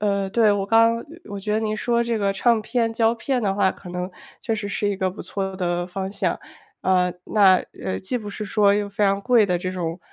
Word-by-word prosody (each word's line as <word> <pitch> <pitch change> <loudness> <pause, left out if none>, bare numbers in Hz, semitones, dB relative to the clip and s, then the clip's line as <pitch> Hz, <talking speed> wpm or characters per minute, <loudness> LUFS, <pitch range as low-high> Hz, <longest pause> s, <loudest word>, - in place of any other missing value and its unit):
呃， 200 -2 0
对， 215 0 +3
我 195 -1 -1
刚 230 +1 +4 0.3
我 200 -1 -5
觉 210 +2 -1
得 220 - +1
你 215 -1 -1
说 235 +2 0
这 230 -2 -1
个 200 -1 +1
唱 225 +3 +2
片、 230 0 -1
胶 225 0 +2
片 245 +1 -1
的 195 -1 +1
话， 195 -2 +2
可 185 - -13
能 180 +1 -4 0.3
确 225 -3 -1
实 205 -1 -4
是 205 +1 -2
一 - - -1
个 190 0 0
不 190 - -9
错 190 -1 -4
的 175 -1 -1
方 190 +1 -4
向。 - - -1 0.4
呃， 180 -1 +3
那， 195 -3 +5 0.3
呃， 95 -1 -2
既 245 +6 -3
不 210 -2 -8
是 210 +1 -5
说 205 -1 +3
又 205 0 0
非 200 +1 -3
常 195 -1 +3
贵 240 -4 +4
的 180 -1 +1
这 185 +1 -3
种 170 -1 -3
200 Hz, 255 characters per minute, -23 LUFS, 190-225 Hz, 0.4 s, 那